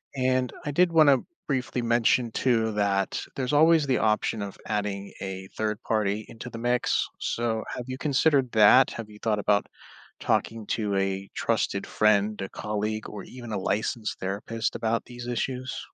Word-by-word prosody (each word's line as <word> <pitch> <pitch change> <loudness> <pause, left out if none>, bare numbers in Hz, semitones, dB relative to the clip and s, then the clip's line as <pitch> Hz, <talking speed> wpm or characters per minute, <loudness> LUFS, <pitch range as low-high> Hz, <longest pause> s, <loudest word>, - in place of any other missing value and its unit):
And 130 -1 +1
I 145 - -1
did 175 +3 +3
wanna 150 -4 +6 0.3
briefly 130 -3 -1
mention 120 0 +2
too 115 -2 +1
that 100 -2 0
there's 130 +1 -2
always 160 0 +5
the 130 -2 +1
option 110 0 +1
of 100 -1 -6
adding 100 -2 -3
a 95 -1 -5
3rd 110 +1 -2
party 105 -1 0
into 115 +2 -9
the 115 - -8
mix, 120 +1 +1
so 115 -1 -1
have 125 - -5
you 130 0 -5
considered 140 -3 +2
that? 110 +4 +7
Have 115 -2 -7
you 105 - -14
thought 110 -2 0
about 105 0 +2 0.5
talking 110 -1 0
to 105 -3 -1
a 95 0 -1
trusted - - 0
friend, 105 -1 +2
a 95 - -4
colleague, 105 +1 -3
or 105 -2 -7
even 120 -3 -9
a 105 - -1
licensed 110 +3 -2
therapist 100 +4 -3
about 115 0 -1
these 120 -1 -9
issues? 125 +1 -3
115 Hz, 165 wpm, -26 LUFS, 105-125 Hz, 0.5 s, that